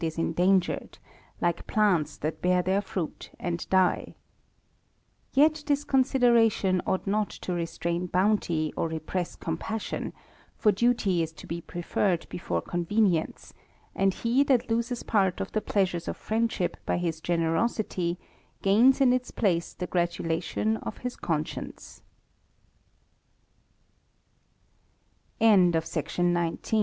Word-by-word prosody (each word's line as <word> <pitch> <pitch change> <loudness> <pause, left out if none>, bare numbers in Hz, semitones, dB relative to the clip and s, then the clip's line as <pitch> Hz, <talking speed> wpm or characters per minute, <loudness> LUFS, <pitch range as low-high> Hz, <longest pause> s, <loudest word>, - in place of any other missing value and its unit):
95 160 -1 -1
is - - -17
endangered, 180 +3 +1 0.4
like 175 -1 -1
plants 200 -8 +2
that 155 +1 -4
bear 180 0 +2
their 190 +2 +1
fruit 185 -5 -5
and 175 -1 -3
die.* 185 -1 +2 1.2
Yet 305 +2 +3
this 285 -1 +1
consideration 235 -9 +3
ought 190 - 0
not 205 +1 0
to 180 - -5
restrain 170 +1 -2
bounty, 180 -4 +1
or - - 0
repress 160 +2 -3
compassion; 215 +7 -4 0.5
for 210 - +4
duty 205 -4 +2
is 160 -1 -2
to - - -12
be 170 +1 -5
preferred 175 +1 -1
before 175 - -3
con 175 0 -2
venience, 200 -6 0 0.4
and 195 0 +3
he 240 +4 +2
that 250 -4 +2
loses 235 +1 -1
part 190 -4 +1
of - - -4
the 215 - 0
pleasures 185 -5 0
of - - -3
friend 225 +1 0
ship 180 - -2
by - - 0
his 165 -2 -2
generosity, 170 +2 0 0.5
gains 235 +8 +5
in 255 -2 +5
its 255 0 -1
place 175 -6 0
the 180 - -4
gratulation 175 +4 -1
of - - -7
his 250 - -2
190 Hz, 120 wpm, -27 LUFS, 170-225 Hz, 1.2 s, gains